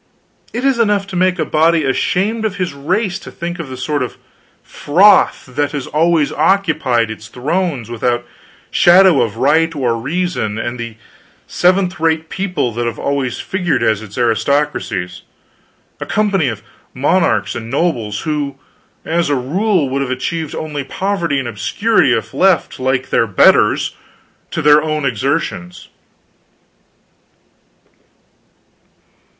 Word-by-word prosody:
It 245 +4 -3
is 270 -3 +2
enough 205 -3 +2
to - - -3
make 185 0 +2
a 155 - -1
body 160 +1 +2
ashamed 195 +11 0
of 215 -3 -1
his 185 -6 -3
race 185 +7 -1
to - - -11
think 175 +1 -6
of 160 -5 -6
the 130 - -7
sort 145 +2 -2
of 125 - -4 0.5
froth 190 +8 +3
that 145 +3 -2
has 145 -3 -3
always 160 0 +1
occupied 155 - +1
its 110 0 -9
thrones 140 - -2
without 120 +1 -1 0.5
shadow 175 -3 +5
of 115 -2 -2
right 160 +6 +2
or 125 -5 0
reason, 140 -4 -2
and 120 +2 -4
the 115 -1 -6 0.5
seventh 185 -1 +1
rate 160 0 0
people 185 -10 -2
that 120 +1 -2
have 115 - -4
always 140 -4 -2
figured 180 -5 -1
as 110 -1 +1
its 105 -2 -11
aristocracies 120 -6 -1 0.8
a - - -6
company 200 -7 +1
of 110 -4 -4 0.3
monarchs 130 - +1
and 115 -1 -6
nobles 120 -8 -1
who, 150 -3 -2 0.5
as 170 -1 0
a 145 - +2
rule, 170 - 0
would 135 +1 -2
have 135 - -2
achieved 155 +4 -3
only 150 -3 -4
poverty 170 0 -2
and 135 -2 -2
obscurity 140 - +1
if 115 +1 -1
left, 185 +5 +2
like 130 0 -1
their 115 - +2
betters, 95 - +3 0.5
to 165 - -3
their 150 0 +6
own 155 -2 -2
exertions. 90 -7 -2
150 Hz, 140 wpm, -16 LUFS, 125-180 Hz, 0.8 s, their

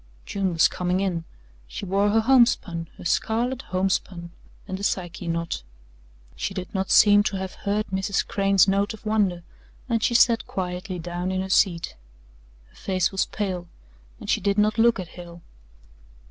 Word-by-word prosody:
June 195 -2 -1
was 165 -1 +4
coming 180 +1 -1
in 180 -4 -2 0.4
she 130 - -6
wore 200 +2 +2
her 225 +2 +3
homespun, 220 -9 +2
her - - -11
scarlet 235 +8 0
homespun 185 -2 -2 0.4
and 190 -1 -4
the - - -7
Psyche 180 -2 -2
knot. 165 - -2 0.7
She 195 - -4
did 185 -2 -6
not 190 -1 -2
seem 205 -1 +7
to 205 - -1
have 190 0 -5
heard 210 +1 -2
Mrs. 195 +1 -1
Crane's 195 -3 +3
note 200 +3 +1
of 220 - -19
wonder, 200 -5 +1 0.4
and 230 -3 0
she 235 - +1
sat 230 -1 +4
quietly 180 +1 -4
down 175 +2 -4
in 185 0 -1
her 190 0 -4
seat. 175 -4 +2 0.7
Her - - -26
face 185 -2 -1
was 195 - 0
pale 185 -4 -4 0.5
and - - -10
she - - +1
did 200 +1 0
not 215 +2 +2
look 235 -2 +4
at 180 -2 -6
Hale. 170 -1 -11
190 Hz, 170 wpm, -24 LUFS, 180-210 Hz, 0.7 s, seem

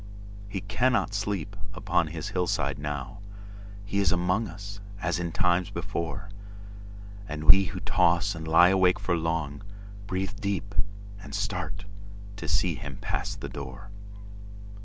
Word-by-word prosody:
He 95 -2 -3
cannot 110 0 +2
sleep 100 -1 -2 0.2
upon 90 -4 +2
his 80 0 -4
hillside 90 -5 0
now. 75 +7 -4 0.7
He 100 0 0
is 100 - +3
among 90 +5 +2
us:—as 100 -1 -4
in 85 -1 -2
times 90 +1 +2
before! 95 -2 -3 1.0
And 75 0 -4
we 95 +6 +8
who - - -5
toss 90 +2 +3
and 80 -1 -6
lie 85 +3 +7
awake 95 -1 +5
for 95 -3 +1
long, 80 -3 -1 0.5
Breathe 95 -1 -1
deep, 100 0 -1 0.5
and 100 - -6
start, 100 -3 -2 0.5
to - - -5
see - - +2
him - - -6
pass - - -2
the - - -6
door. 70 +8 -7
95 Hz, 135 wpm, -28 LUFS, 85-100 Hz, 1.0 s, we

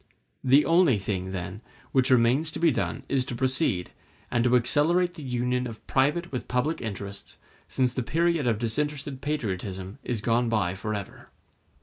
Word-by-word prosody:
The 135 +3 +5
only 165 - +4
thing, 95 -1 -3
then, 95 +2 -5 0.3
which 130 -1 +3
remains 130 +5 +3
to - - -4
be 165 -2 +4
done 135 +1 -2
is 135 -2 +1
to 125 - -4
proceed, 130 - 0 0.4
and 120 -2 +2
to 125 0 +4
accelerate 165 +9 +3
the 170 - -10
union 125 -1 -1
of 115 -2 -10
private 150 +6 +1
with 125 - -4
public 125 +6 0
interests, 100 -2 -6 0.3
since 125 -2 +1
the 130 - -1
period 160 +3 +1
of 115 -3 +2
disinterested 140 +4 -2
patriotism 100 -7 -3
is 120 -3 -2
gone 115 +2 +1
by 105 -6 +1
forever. 100 +1 -6
125 Hz, 160 wpm, -27 LUFS, 110-145 Hz, 0.4 s, The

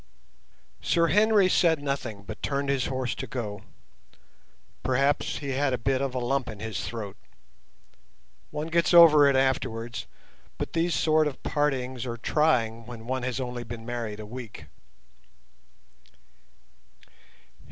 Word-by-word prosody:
Sir 170 -1 +2
Henry 210 -1 +5
said 165 -3 +3
nothing, 120 -7 -3
but 105 +2 -9
turned 140 -1 -1
his 135 -2 +1
horse 130 -2 -2
to - - -6
go; 105 -6 -5 1.2
perhaps 135 +3 +1
he 140 - -5
had 135 0 0
a - - +1
bit 130 +2 0
of 135 -2 -2
a - - 0
lump 130 +1 -1
in 105 - -8
his 110 0 -4
throat. 105 -4 -6 1.3
One 150 +1 -4
gets 170 +1 +2
over 155 -4 +9
it 140 - +2
afterwards, 120 -4 -1 0.5
but - - -4
these 170 +1 +1
sort 155 -1 +3
of 145 - -7
partings 130 -4 -1
are 120 -1 -4
trying 115 -3 +1
when 115 -2 -9
one 130 +1 -2
has 125 +1 -2
only 125 -2 -4
been 115 -1 -8
married 115 -3 -4
a 110 - -7
week. 115 -7 -9
130 Hz, 140 wpm, -27 LUFS, 115-145 Hz, 1.3 s, over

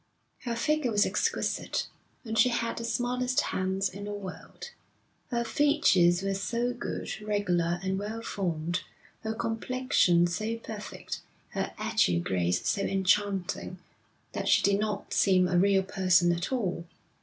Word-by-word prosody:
Her 235 -1 -1
figure 300 +2 +1
was 205 -1 +4
exquisite, - - -1 0.4
and 220 -1 -3
she 250 - +5
had 230 -1 -1
the 230 - -4
smallest 245 +2 0
hands 190 +1 -1
in 200 +2 -8
the 205 - -4
world. 205 - -8 0.6
Her 235 -2 0
features 225 - +3
were 195 0 0
so 235 +5 -1
good, 240 -2 -5
regular 180 -5 0
and 190 0 -1
well 220 +3 -5
formed, 175 -4 -2 0.4
her 220 0 -3
complexion 225 -6 +2
so 215 +6 -2
perfect, 220 -2 -7 0.3
her - - -3
agile 85 -1 +2
grace 90 0 0
so 200 - +1
enchanting, 195 -1 0 0.5
that - - -3
she - - +4
did 200 0 +3
not 210 -1 -3
seem 185 -2 +4
a 180 - 0
real 195 0 +4
person 185 -2 +3
at 170 +6 -2
all. 190 -9 -1
200 Hz, 145 wpm, -29 LUFS, 180-230 Hz, 0.6 s, she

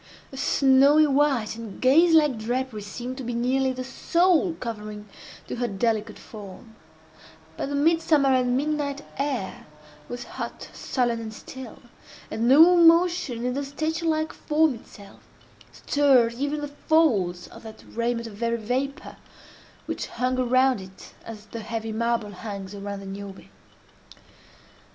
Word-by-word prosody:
A 270 - -9
snowy 275 +3 +5
white 275 -6 +1
and 225 -3 -9
gauze 325 +6 +5
like 295 -7 +3
drapery 240 0 -3
seemed 245 +5 -6
to - - -5
be 240 0 -4
nearly 260 +2 +1
the 255 0 -5
sole 340 +5 +2
covering 210 -4 -7 0.4
to - - -6
her 245 0 -1
delicate 215 +1 -1
form; 215 +1 -12 0.8
but - - -4
the 285 - -2
mid 325 +3 +3
summer 290 -5 +3
and 250 -1 +2
midnight 290 -1 -2 0.2
air 265 -9 -3 0.4
was 245 0 -5
hot, - - -7
sullen, 240 -3 -1
and 225 -1 -6
still, 250 +2 -10 0.5
and 225 +2 -1
no 320 +7 +7
motion 335 -7 +4
in 250 - 0
the 280 +2 -2
statue 315 +4 -3
like 315 0 0
form 310 -1 +1
itself, 205 -3 -14 0.5
stirred 265 -5 +3
even 285 +4 -2
the 290 - -3
folds 245 - +1
of - - -13
that 220 -1 -11
raiment 235 0 -2
of 225 - -8
very 235 +2 -1
vapor 255 +5 -3 0.7
which - - -4
hung 255 +1 -1
around 255 -2 +3
it 190 0 -13
as 215 -2 -9
the 230 +2 -8
heavy 225 0 -4
marble 230 -1 -1
hangs 200 -1 -7
around 200 0 -6
the - - -10
Niobe. 195 0 -8
250 Hz, 145 wpm, -25 LUFS, 220-285 Hz, 0.8 s, no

